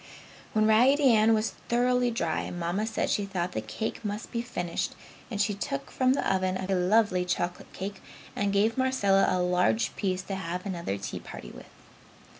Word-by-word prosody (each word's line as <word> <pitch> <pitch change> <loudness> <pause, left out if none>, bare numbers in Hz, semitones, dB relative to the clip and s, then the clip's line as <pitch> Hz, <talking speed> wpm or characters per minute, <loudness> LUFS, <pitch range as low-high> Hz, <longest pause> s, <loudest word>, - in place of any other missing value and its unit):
When 215 0 +3
Raggedy 255 +5 +5
Ann 220 +1 +5
was 215 0 0 0.2
thoroughly 245 +1 +3
dry, 170 -9 -1
Mamma 175 +5 -2
said 220 - -1
she 205 -1 0
thought 180 -2 -2
the - - -3
cake 220 +1 -4
must 210 0 -4
be 235 - -1
finished 175 -8 -3 0.3
and 210 -5 -4
she 205 0 +2
took 140 -8 -4
from 255 0 +3
the - - -1
oven 185 -1 +1
a 190 +1 -2
lovely 185 0 +3
chocolate 180 0 -3
cake 195 +1 -6 0.3
and 200 0 0
gave 215 +5 +2
Marcella 205 -7 +3
a - - +1
large 180 +5 +1
piece 185 -2 -1
to 195 - -5
have 180 -1 -4
another 170 - -3
tea 100 - -5
party - - -9
with. - - -12
200 Hz, 180 wpm, -28 LUFS, 180-225 Hz, 0.3 s, Raggedy